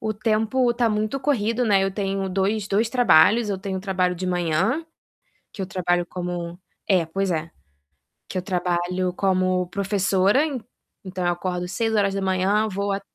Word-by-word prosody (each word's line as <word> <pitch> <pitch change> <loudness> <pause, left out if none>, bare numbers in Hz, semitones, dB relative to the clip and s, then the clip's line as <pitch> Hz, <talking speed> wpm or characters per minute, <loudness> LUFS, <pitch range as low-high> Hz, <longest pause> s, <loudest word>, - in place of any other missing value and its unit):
O 215 - -1
tempo 225 +3 +1
tá 240 -1 +2
muito 215 +4 -1
corrido, 240 -3 +1
né, 200 -3 +3
eu 195 - 0
tenho 195 -1 -2
dois 195 +2 -1
dois 215 +3 +1
trabalhos, 230 -2 +5
eu 195 - -2
tenho 190 -1 -4
trabalho 185 -2 0
de 185 +1 -4
manhã, 180 - 0 0.7
que 200 - -6
eu - - -1
trabalho 175 -2 0
como 175 -1 -5 0.3
é, 180 -4 +3
pois 195 +3 -2
é, 165 0 -2 0.8
que - - -9
eu 185 - 0
trabalho 180 0 -1
como 185 -1 +1
professora, 195 +4 +2 0.6
então, 185 -1 -4
eu 175 - +3
acordo 180 0 -3
6h 195 0 +1
vou 200 0 -2
a 195 - -3
195 Hz, 155 wpm, -23 LUFS, 180-210 Hz, 0.8 s, trabalhos